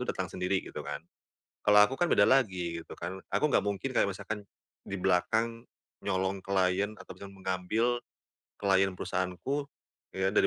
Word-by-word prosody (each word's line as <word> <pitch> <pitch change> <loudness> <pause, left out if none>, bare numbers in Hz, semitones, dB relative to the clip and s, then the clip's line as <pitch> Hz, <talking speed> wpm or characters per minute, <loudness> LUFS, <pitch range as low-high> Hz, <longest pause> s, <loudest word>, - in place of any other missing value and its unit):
itu 125 - -4
datang 95 - -1
sendiri 90 +1 0
gitu - - -7
kan. - - -4 0.7
Kalau 105 0 +7
aku 135 - -4
kan 175 +3 +1
beda 100 - +6
lagi 90 -10 +2
gitu - - -11
kan, 95 +3 -5
aku 150 - +2
nggak - - +3
mungkin 100 +5 -2
kayak 100 - +4
misalkan 100 +2 -5 0.4
di 100 - -5
belakang 110 +6 +1 0.4
nyolong 95 0 -1
client 100 +2 +1
atau - - -10
bisa 100 - -9
mengambil 95 +6 0 0.6
client 95 -1 +3
perusahaanku 95 +12 -2 0.5
ya 95 0 +1
dari 105 - +4
100 Hz, 160 wpm, -30 LUFS, 95-110 Hz, 0.7 s, Kalau